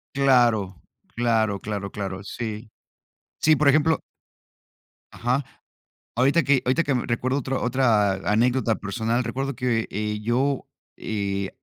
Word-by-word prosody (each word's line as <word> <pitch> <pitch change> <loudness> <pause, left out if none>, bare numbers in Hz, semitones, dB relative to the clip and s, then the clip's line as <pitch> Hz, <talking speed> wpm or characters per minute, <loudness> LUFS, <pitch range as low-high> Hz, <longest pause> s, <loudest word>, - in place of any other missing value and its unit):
Claro, 120 -8 +3 0.4
claro, 110 -4 +1
claro, 100 -2 -4
claro. 95 -2 -5
Sí, 110 +2 -6 0.7
sí, 155 0 +5
por 150 0 +2
ejemplo 155 +3 +3 1.1
ajá. 125 +4 0 0.7
Ahorita 140 +7 +3
que 140 -2 +3
ahorita 130 +7 +2
que 145 - 0
me 125 - -1
recuerdo 130 +3 0
otro 135 0 -2
otra 115 -6 +3 0.2
anécdota 120 +1 +2
personal, 110 +5 -1
recuerdo 135 +3 -3
que, 115 -3 0
eh, 105 +1 -3
yo, 130 +5 0 0.3
eh, 100 -2 -2
120 Hz, 125 wpm, -24 LUFS, 105-135 Hz, 1.1 s, sí